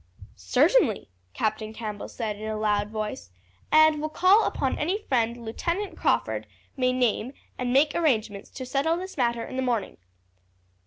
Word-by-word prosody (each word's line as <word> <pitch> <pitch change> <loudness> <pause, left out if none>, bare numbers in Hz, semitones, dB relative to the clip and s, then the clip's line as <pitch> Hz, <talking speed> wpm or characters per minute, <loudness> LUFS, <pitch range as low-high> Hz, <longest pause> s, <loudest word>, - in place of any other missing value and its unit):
"Certainly," 290 - +2 0.3
Captain 215 0 -2
Campbell 215 -2 -6
said 220 -3 -4
in 215 +1 -7
a 215 - -2
loud 210 -1 0
voice; 215 - -5 0.4
"and 310 -1 +5
will 310 - -2
call 370 +7 +4
upon 265 -2 -1
any 355 +7 0
friend 235 -2 0
Lieutenant 345 - -3
Crawford 110 -2 0 0.3
may 255 -1 +2
name 250 0 0 0.2
and 250 -1 -2
make 285 +4 +4
arrangements 220 -11 0
to 260 - -7
settle 285 +6 0
this 375 +1 -7
matter 235 -3 0
in 260 - -7
the - - +1
morning." 240 -5 -1
245 Hz, 155 wpm, -26 LUFS, 215-305 Hz, 0.4 s, and